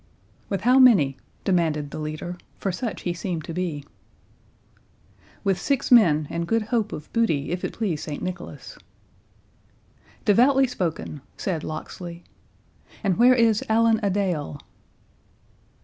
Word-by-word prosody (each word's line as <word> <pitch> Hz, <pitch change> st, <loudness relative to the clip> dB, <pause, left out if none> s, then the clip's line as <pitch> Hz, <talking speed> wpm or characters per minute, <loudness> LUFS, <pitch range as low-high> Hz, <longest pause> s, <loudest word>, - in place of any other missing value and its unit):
"With 195 Hz, -, -2 dB
how 250 Hz, +3 st, +5 dB
many?" 190 Hz, -, +6 dB, 0.3 s
demanded 160 Hz, -6 st, 0 dB
the -, -, -6 dB
leader, 155 Hz, +3 st, -5 dB, 0.2 s
for 195 Hz, -, -2 dB
such 225 Hz, +4 st, -4 dB
he 175 Hz, -, -1 dB
seemed 170 Hz, -1 st, -4 dB
to 165 Hz, -, -6 dB
be. 160 Hz, -5 st, -3 dB, 1.6 s
"With 195 Hz, -3 st, +1 dB
six 280 Hz, -2 st, 0 dB
men, 165 Hz, -11 st, +6 dB
and 170 Hz, 0 st, -2 dB
good 225 Hz, +2 st, +1 dB
hope 220 Hz, -1 st, -1 dB
of 150 Hz, -, -8 dB
booty, 165 Hz, -11 st, +1 dB
if 180 Hz, +1 st, -3 dB
it -, -, -3 dB
please 190 Hz, -9 st, -2 dB
St 150 Hz, -, -5 dB
Nicholas." 180 Hz, -1 st, -7 dB, 1.5 s
"Devoutly 260 Hz, +6 st, +5 dB
spoken," 170 Hz, -, -4 dB, 0.2 s
said 170 Hz, -5 st, -2 dB
Locksley; 170 Hz, +2 st, -7 dB, 0.8 s
"and 195 Hz, -4 st, +1 dB
where 250 Hz, +2 st, +7 dB
is 225 Hz, -3 st, +3 dB
Allan 225 Hz, 0 st, +4 dB
a 205 Hz, -, +1 dB
Dale?" 180 Hz, -7 st, -1 dB
185 Hz, 135 wpm, -24 LUFS, 160-225 Hz, 1.6 s, where